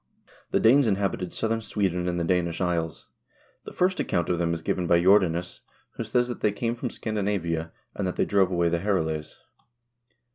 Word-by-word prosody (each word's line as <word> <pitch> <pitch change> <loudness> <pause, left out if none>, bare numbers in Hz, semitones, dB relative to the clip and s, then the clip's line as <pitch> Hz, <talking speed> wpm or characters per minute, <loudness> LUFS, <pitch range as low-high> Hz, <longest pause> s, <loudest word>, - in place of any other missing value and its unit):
The - - +1
Danes 130 +3 +5
inhabited 100 -3 -1
southern 115 0 -1
Sweden 95 -5 -1
and 90 0 -1
the - - 0
Danish 85 -1 0
isles. 85 -3 -2 0.6
The - - -7
first 185 +1 +1
account 85 - 0
of 90 -1 0
them 85 -1 +1
is 80 -1 -3
given 90 -2 -1
by 85 0 +4
Jordanes, 90 -2 +3 0.3
who - - -5
says 120 +2 +1
that 120 - -6
they 105 - +2
came 115 +3 -2
from 120 +1 -4
Scandinavia, 95 -8 -2 0.2
and 100 - -2
that 90 - -3
they - - +1
drove 100 -2 +3
away 85 -2 +1
the 85 0 0
Herules. 80 -6 -2
90 Hz, 185 wpm, -26 LUFS, 85-105 Hz, 0.6 s, Danes